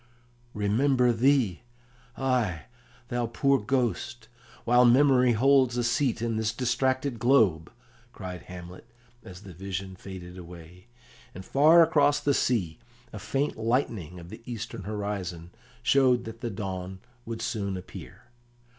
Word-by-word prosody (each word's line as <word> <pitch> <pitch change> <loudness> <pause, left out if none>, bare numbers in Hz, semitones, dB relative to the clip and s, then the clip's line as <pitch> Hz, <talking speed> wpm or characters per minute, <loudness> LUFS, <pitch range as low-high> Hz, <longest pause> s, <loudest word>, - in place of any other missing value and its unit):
"Remember 125 +5 +2
thee! 120 -6 +2 0.6
Ay, 120 - 0 0.5
thou 120 -1 -1
poor 135 +4 +2
Ghost, 120 0 -2 0.3
while 120 +1 +4
memory 125 0 +5
holds 130 +1 +3
a 120 - +1
seat 120 -1 0
in 115 -1 -1
this 110 0 0
distracted 130 +1 -1
globe," 105 -11 +3 0.4
cried 90 -4 -8
Hamlet, 90 +3 -10 0.4
as 90 +2 -12
the 95 -3 -11
vision 95 +1 -6
faded 90 -1 -10
away, 90 +2 -13 0.5
and 95 +1 -9
far 160 +5 +6
across 145 -2 +3
the 145 - +1
sea 95 -13 0 0.3
a - - -6
faint 140 +2 -2
lightening 110 - -2
of 85 0 -11
the 110 +4 -10
eastern 110 -4 -6
horizon 100 -5 -5 0.3
showed 130 - +3
that 115 0 -9
the 120 - -3
dawn 95 -2 -5 0.3
would 115 -1 -6
soon 105 -5 -3
appear. 90 - -11
115 Hz, 130 wpm, -27 LUFS, 95-130 Hz, 0.6 s, far